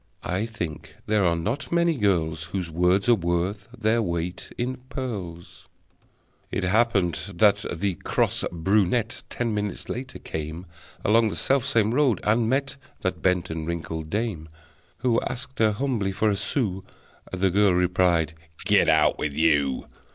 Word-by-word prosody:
(I 95 +6 -1
think 85 -10 -6
there 105 -1 +2
are 85 -1 +3
not 110 - -3
many 170 -1 +3
girls 80 - 0
Whose 85 0 -4
words 90 +5 +2
are 120 - +7
worth 90 +1 -1
their 115 +1 +2
weight 85 -2 -3
in 125 +2 -2
pearls!) 95 -11 -6 0.8
It 95 - -2
happened 100 -3 +2 0.2
that 105 +2 +4
the 95 +3 -1
cross - - 0
brunette, 100 +6 +1
Ten 120 -2 -2
minutes 105 -2 -3
later, 130 +2 -5
came 80 +3 -6 0.4
Along 110 +1 +4
the - - -5
self 135 -1 +1
same 115 -4 +2
road, 130 -7 +3
and 110 +1 +2
met 140 +2 0 0.2
That 95 - -2
bent 90 -3 +1
and 80 -1 -4
wrinkled 80 -2 -4
dame, 100 -7 -2 0.5
Who 120 -3 +2
asked 130 +1 -6
her 110 -1 +4
humbly 110 -4 -1
for 110 +2 +2
a - - +1
sou. 100 -3 -1 0.5
The 95 0 +1
girl 100 -1 +4
replied: 90 -3 +2 0.3
"Get - - +4
out - - +4
with 75 -1 -2
you!" 70 -4 +2
100 Hz, 150 wpm, -25 LUFS, 85-115 Hz, 0.8 s, are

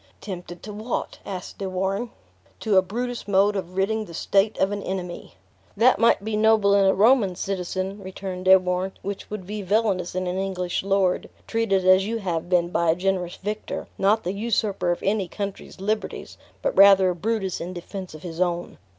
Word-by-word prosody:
"Tempted 175 -3 -8
to 210 - -7
what?" 215 +4 -4
asked 185 -2 -6
De 195 -1 -3
Warenne. 195 +5 -1 0.5
"To 215 -3 +1
a 190 - +7
Brutus 240 +5 -4
mode 200 +1 +3
of 185 -1 -5
ridding 215 +3 0
the 170 - -10
state 200 +5 +2
of 190 +1 +2
an 205 0 -3
enemy." 180 -2 -5 0.4
"That 245 +4 +5
might 230 -3 +4
be 220 0 -2
noble 215 -2 +4
in 200 -1 +5
a 190 - +5
Roman 210 -2 +4
citizen," 190 +1 -3
returned 185 -1 -6
De 190 0 +9
Warenne, 185 +1 -2
"which 200 0 -5
would 210 -3 -6
be 210 +2 -5
villainous 195 -3 0
in 185 0 -1
an 180 +1 -2
English 185 -2 -2
lord, 195 -2 +1 0.2
treated 195 -5 0
as 185 +1 +5
you 230 +1 -1
have 175 -5 -3
been 175 -2 +2
by 170 -1 +1
a 160 - +4
generous 180 -1 -1
victor, 210 +2 -5
not 210 +3 +3
the 180 - -2
usurper 200 -3 0
of 175 - -3
any 200 -2 +1
country's 200 +1 -6
liberties, 215 +3 -3 0.3
but - - 0
rather 195 -1 +7
a - - -4
Brutus 195 0 -2
in 175 - -4
defense 185 0 -7
of 155 - -12
his 170 -1 -5
own. 175 -1 -1
195 Hz, 195 wpm, -24 LUFS, 180-210 Hz, 0.5 s, De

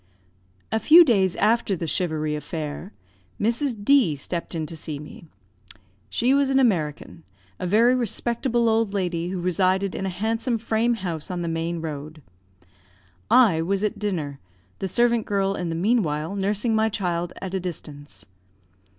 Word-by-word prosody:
A 220 - +1
few 330 +9 +8
days 195 - +2
after 215 -1 +2
the 170 - -4
charivari 155 -2 -1
affair, 155 +4 -5 0.5
Mrs. 230 -1 -1
D 260 - +4
stepped 170 +5 -4
in 160 -1 -2
to 165 - -8
see 155 -1 -5
me. 150 +3 -11 0.8
She 245 +3 +2
was 280 -1 +3
an 270 - +2
American; 165 - 0 0.4
a 180 - -2
very 230 +6 +4
respectable 240 0 0
old 220 -2 +1
lady, 175 -3 -1
who 185 0 -3
resided 185 +2 +1
in 195 - -3
a - - -1
handsome 225 +6 -1
frame 225 +1 0
house 175 -7 -5
on 180 -1 -3
the - - -3
main 165 +1 -2
road. 155 -1 -7 1.1
I 210 -11 +5
was 195 +4 -1
at 210 - -1
dinner, 160 -9 -3 0.4
the 195 - -2
servant 235 +3 +1
girl, 195 -1 +1
in 175 -3 -3
the 165 - -2
meanwhile, 170 -4 0
nursing 205 +3 0
my 220 0 +2
child 175 -4 -2
at 190 -1 -6
a 190 - 0
distance. 150 -5 -8
190 Hz, 160 wpm, -24 LUFS, 165-225 Hz, 1.1 s, few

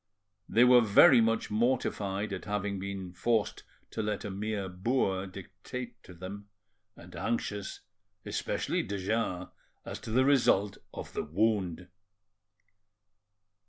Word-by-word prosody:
They 115 - +5
were 125 0 +7
very 115 +3 +7
much 115 -1 +1
mortified 105 -3 0
at 95 - -5
having 105 -1 -2
been 95 -2 -5
forced 110 +3 0 0.3
to 110 - -2
let 105 -1 -2
a 100 - -4
mere 100 0 -3
boor 95 0 0
dictate 100 +6 -8
to 90 - -13
them, 100 +4 -8 0.5
and 85 +1 -13
anxious, 105 -3 -3 0.4
especially - - -1
de 100 +1 -4
Jars, 95 -2 -1 0.4
as - - -6
to - - -9
the 130 +4 +3
result 110 -8 +3
of - - -8
the - - -1
wound. 90 0 0
100 Hz, 125 wpm, -30 LUFS, 95-115 Hz, 0.5 s, were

